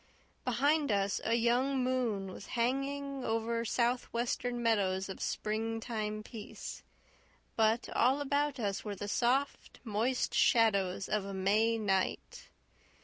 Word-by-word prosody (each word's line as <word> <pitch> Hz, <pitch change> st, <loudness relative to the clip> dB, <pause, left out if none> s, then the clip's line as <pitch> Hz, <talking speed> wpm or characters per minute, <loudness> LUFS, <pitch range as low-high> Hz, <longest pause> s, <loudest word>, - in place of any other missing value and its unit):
Behind 285 Hz, +3 st, +2 dB
us 200 Hz, -1 st, +1 dB
a 230 Hz, -, +2 dB
young 250 Hz, +3 st, +2 dB
moon 235 Hz, -7 st, -1 dB
was 195 Hz, -, -10 dB
hanging 275 Hz, +2 st, -1 dB
over 230 Hz, +1 st, -1 dB
southwestern 240 Hz, 0 st, -1 dB
meadows 195 Hz, -4 st, +1 dB
of 190 Hz, -, -7 dB
spring 225 Hz, +1 st, -2 dB
time 215 Hz, -2 st, -3 dB
peace, 215 Hz, -1 st, -8 dB, 0.7 s
but 225 Hz, +1 st, +2 dB
all 260 Hz, +4 st, +3 dB
about 285 Hz, 0 st, 0 dB
us 200 Hz, -4 st, -2 dB
were 205 Hz, -2 st, -4 dB
the 205 Hz, +1 st, -5 dB
soft, 255 Hz, +6 st, 0 dB
moist 230 Hz, +3 st, 0 dB
shadows 200 Hz, -7 st, +3 dB
of 210 Hz, -2 st, 0 dB
a 195 Hz, 0 st, -6 dB
May 215 Hz, +4 st, +2 dB
night. 195 Hz, -3 st, -1 dB
230 Hz, 125 wpm, -32 LUFS, 210-255 Hz, 0.7 s, all